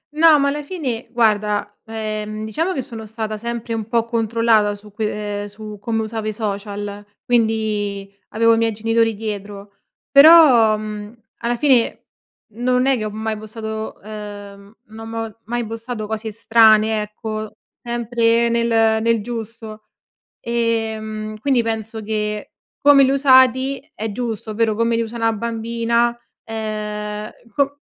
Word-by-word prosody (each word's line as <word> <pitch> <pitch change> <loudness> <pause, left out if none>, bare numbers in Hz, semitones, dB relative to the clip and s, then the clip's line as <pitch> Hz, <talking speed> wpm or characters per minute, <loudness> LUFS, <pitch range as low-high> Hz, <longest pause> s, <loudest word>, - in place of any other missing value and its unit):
No, 315 -1 +6
ma 280 - +2
alla 295 +1 -2
fine 280 -8 -4
guarda, 210 -3 +1
ehm, 215 -1 -4
diciamo 325 - -1
che 270 - -2
sono 230 -4 -8
stata 215 0 -4
sempre 235 +1 -4
un 220 -2 -3
po' 230 0 +1
controllata 230 -2 +2
su 210 +1 -14
que 210 -1 -3
ehm, - - -5
su 210 +1 -9
come 225 0 -1
usavo 220 0 -4
i 215 - -1
social, 205 -1 -5 0.2
quindi 215 -4 0
avevo 230 +1 +3
i - - +2
miei 225 0 +2
genitori 225 +1 +1
dietro. 200 -1 -7 0.3
Però, 280 -7 +8
mhmm, 210 0 -7 0.3
alla 235 +1 -1
fine 260 -4 +2 0.5
non 250 +2 +1
è 270 0 +3
che 220 - -3
ho - - -2
mai 220 +1 -3
postato 220 0 -6
uhm, 205 -1 -9
no 220 +1 -10
mo 225 -1 -5
mai 240 +1 -2
postato 225 0 -5
cose 220 0 -4
strane 220 -1 +4
ecco, 215 0 -5 0.3
sempre 235 0 +1
nel 235 0 +1 0.3
nel 230 -1 +2
giusto. 225 -1 -7 0.6
Ehm, 220 -2 -2
quindi 255 +1 +2
penso 225 -1 -4
che 210 0 -3 0.4
come 285 -1 +8
li 265 - +2
ho - - +2
usati 260 -1 +4
è 220 +1 -4
giusto, 225 -1 -4
ovvero 220 0 +1
come 230 +1 +1
li 230 - +1
usa 230 +1 -6
'na 225 0 +2
bambina, 235 +1 0 0.3
ehm, 210 -1 -4 0.2
co 280 0 0
225 Hz, 145 wpm, -20 LUFS, 215-235 Hz, 0.6 s, Però